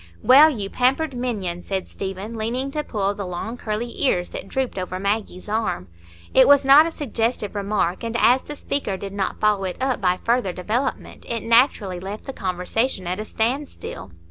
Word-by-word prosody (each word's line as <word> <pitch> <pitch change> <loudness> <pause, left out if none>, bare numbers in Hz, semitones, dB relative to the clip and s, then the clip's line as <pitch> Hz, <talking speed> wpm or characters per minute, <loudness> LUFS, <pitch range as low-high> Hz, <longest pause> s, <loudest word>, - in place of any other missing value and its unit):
"Well, 285 +5 +8
you 215 -10 -3
pampered 265 +6 +1
minion!" 205 -8 -3
said 190 0 -3
Stephen, 195 +3 -6
leaning 245 +5 -2
to 300 +1 -2
pull 205 -6 -1
the 205 - -5
long 180 +5 -5
curly 235 0 -4
ears 180 -9 +2
that - - -7
drooped 260 -3 -2
over 185 0 -4
Maggie's 200 -2 -2
arm. 210 - -2 0.4
It 260 - +7
was 285 -1 +6
not 285 +4 +8
a - - -4
suggestive 230 -7 -2
remark, 200 -3 -1
and 230 0 -2
as 255 +2 +5
the 295 - -8
speaker 275 -9 -2
did 195 0 -7
not 195 -1 -2
follow 210 -2 +2
it 185 - -4
up 260 -4 -1
by 180 -1 +2
further 235 -6 +1
development, 230 +9 -3
it 230 -1 -2
naturally 230 -6 +3
left 195 +4 -7
the 270 - -5
conversation 185 +3 -1
at 180 +3 -2
a 215 - -4
standstill. 240 - -3
215 Hz, 185 wpm, -22 LUFS, 190-255 Hz, 0.4 s, Well